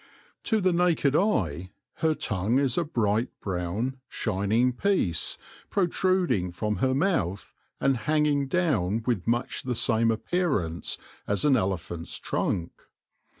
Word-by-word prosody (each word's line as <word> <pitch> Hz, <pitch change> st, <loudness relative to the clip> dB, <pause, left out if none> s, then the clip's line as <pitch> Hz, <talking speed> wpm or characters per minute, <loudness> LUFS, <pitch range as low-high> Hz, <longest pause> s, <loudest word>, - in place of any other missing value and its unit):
To 220 Hz, -3 st, +2 dB
the 185 Hz, -2 st, +2 dB
naked 170 Hz, -5 st, +2 dB
eye 95 Hz, -, 0 dB, 0.2 s
her 160 Hz, -1 st, +2 dB
tongue 105 Hz, +2 st, 0 dB
is 135 Hz, -3 st, +2 dB
a 175 Hz, -, +2 dB
bright 115 Hz, -5 st, 0 dB
brown, 100 Hz, +8 st, -2 dB
shining 110 Hz, +4 st, +1 dB
piece, 125 Hz, -, 0 dB, 0.3 s
protruding 175 Hz, -, +1 dB
from 105 Hz, +3 st, -2 dB
her 130 Hz, 0 st, +1 dB
mouth, 135 Hz, -, 0 dB, 0.3 s
and 135 Hz, -2 st, +2 dB
hang 150 Hz, +6 st, +1 dB
ing 140 Hz, -2 st, +1 dB
down 115 Hz, -, +1 dB
with 115 Hz, -7 st, -1 dB
much 120 Hz, +2 st, 0 dB
the 125 Hz, -2 st, -2 dB
same 115 Hz, 0 st, +3 dB
appearance 110 Hz, -, -1 dB, 0.3 s
as 100 Hz, +8 st, +1 dB
an 140 Hz, -3 st, +5 dB
elephant's 90 Hz, -6 st, -2 dB
trunk. 85 Hz, -1 st, -2 dB
120 Hz, 130 wpm, -27 LUFS, 100-155 Hz, 0.3 s, an